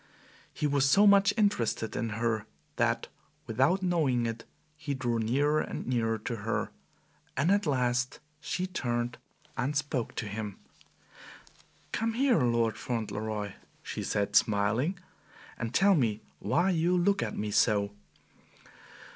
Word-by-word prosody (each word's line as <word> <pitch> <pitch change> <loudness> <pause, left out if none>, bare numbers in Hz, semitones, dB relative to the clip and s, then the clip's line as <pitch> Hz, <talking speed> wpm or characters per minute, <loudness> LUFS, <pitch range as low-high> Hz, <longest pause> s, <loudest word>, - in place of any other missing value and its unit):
He - - -3
was 140 -2 +3
so 200 +8 +6
much 200 -1 +6
interested 120 - +1
in 115 - -1
her 110 -2 -1 0.3
that - - +1 0.4
without 135 - +2
knowing 150 -10 +2
it 115 0 -4 0.3
he 145 -2 -4
drew 120 -3 -1
nearer 145 +7 +2
and - - -5
nearer 115 -3 0
to 115 +2 -4
her, 110 +2 -2 0.7
and 145 +7 +3
at 200 -3 +2
last 125 -2 0 0.2
she 180 +4 -2
turned 120 -9 -2 0.4
and 140 +4 -1
spoke 145 -5 -2
to 115 - -3
him. 105 -1 -5 1.3
"Come 225 +1 -1
here, 255 - +3
Lord 115 -2 +1
Fauntleroy," 110 -3 -3 0.3
she - - -5
said, 100 -1 -1
smiling; 110 - +2 0.6
"and 115 -1 -4
tell 195 +8 +5
me 115 - +1 0.2
why 170 - +2
you 175 +1 +2
look 200 +3 +2
at - - -3
me 105 0 -2
so." 105 -2 +3
125 Hz, 135 wpm, -29 LUFS, 110-165 Hz, 1.3 s, so